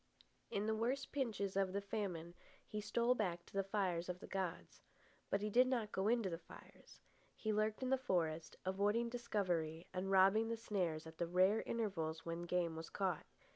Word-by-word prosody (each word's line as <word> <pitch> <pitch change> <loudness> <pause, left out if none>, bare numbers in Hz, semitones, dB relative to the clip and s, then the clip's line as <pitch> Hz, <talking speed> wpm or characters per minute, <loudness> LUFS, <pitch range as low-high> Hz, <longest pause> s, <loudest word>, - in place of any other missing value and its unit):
In 200 +1 -1
the 220 - +2
worst 245 +5 -1
pinches 220 -8 -1
of 195 -1 +2
the 200 - +1
famine 190 -5 -3 0.3
he 210 - -3
stole 235 +4 +2
back 180 -7 -1
to - - -18
the 195 0 +1
fires 185 -3 0
of 180 0 -3
the - - -8
gods. 185 -3 -4 0.5
But 200 - +1
he 210 0 -1
did 250 +4 +6
not 235 -5 0
go 190 +1 0
into 230 -2 +3
the 165 -2 -3
fires. - - -15 0.4
He 215 -1 -1
lurked 215 +3 +1
in 255 - 0
the 265 - +4
forest, 165 -8 0
avoiding 205 +5 +2
discovery 180 -9 -1
and 185 +1 -2
robbing 195 +3 +6
the 230 0 -1
snares 180 -8 -1
at 160 0 -11
the 170 - +1
rare 185 +5 +4
intervals 165 -8 -2
when 170 +1 -3
game 170 -2 +1
was 160 0 -6
caught. 185 -5 -1
195 Hz, 190 wpm, -39 LUFS, 175-220 Hz, 0.5 s, did